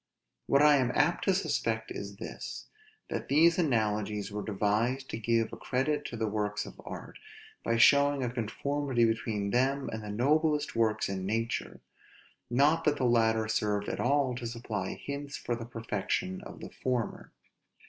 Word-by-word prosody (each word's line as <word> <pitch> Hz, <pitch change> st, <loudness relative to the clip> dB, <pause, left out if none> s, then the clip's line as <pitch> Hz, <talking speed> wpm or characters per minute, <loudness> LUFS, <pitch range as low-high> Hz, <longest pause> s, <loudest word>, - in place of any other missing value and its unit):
What 140 Hz, +1 st, +4 dB
I 150 Hz, -1 st, +7 dB
am 125 Hz, -2 st, +1 dB
apt 150 Hz, +4 st, +2 dB
to 195 Hz, -, +4 dB
suspect 135 Hz, -, -1 dB
is 100 Hz, 0 st, -6 dB
this: 110 Hz, -, -7 dB, 0.5 s
that -, -, -3 dB
these 165 Hz, +4 st, +5 dB
analogies 105 Hz, -, 0 dB
were 105 Hz, 0 st, -3 dB
devised 110 Hz, +6 st, 0 dB
to -, -, -4 dB
give 115 Hz, 0 st, +1 dB
a -, -, -6 dB
credit 135 Hz, +4 st, -1 dB
to 115 Hz, -, -5 dB
the 110 Hz, -, 0 dB
works 105 Hz, -1 st, -2 dB
of -, -, -11 dB
art, -, -, -8 dB, 0.4 s
by 115 Hz, -, +1 dB
showing 140 Hz, +2 st, +5 dB
a 125 Hz, -, 0 dB
conformity 125 Hz, +2 st, 0 dB
between 110 Hz, -3 st, -1 dB
them 135 Hz, +3 st, +1 dB
and 110 Hz, -, -4 dB
the 105 Hz, -, -6 dB
noblest 150 Hz, +7 st, +1 dB
works 110 Hz, -2 st, +2 dB
in 95 Hz, -1 st, -3 dB
nature; 115 Hz, +2 st, -2 dB, 0.7 s
not 145 Hz, +7 st, +3 dB
that 150 Hz, -1 st, +3 dB
the 130 Hz, -, 0 dB
latter 110 Hz, -2 st, +3 dB
served 105 Hz, -1 st, 0 dB
at -, -, -3 dB
all 135 Hz, 0 st, +2 dB
to 120 Hz, -2 st, -4 dB
supply 115 Hz, -5 st, -4 dB
hints 140 Hz, 0 st, -6 dB
for 120 Hz, -, -2 dB
the 115 Hz, -1 st, -6 dB
perfection 105 Hz, -5 st, -3 dB
of -, -, -11 dB
the -, -, -8 dB
former. 125 Hz, -3 st, -3 dB
115 Hz, 170 wpm, -30 LUFS, 110-140 Hz, 0.7 s, I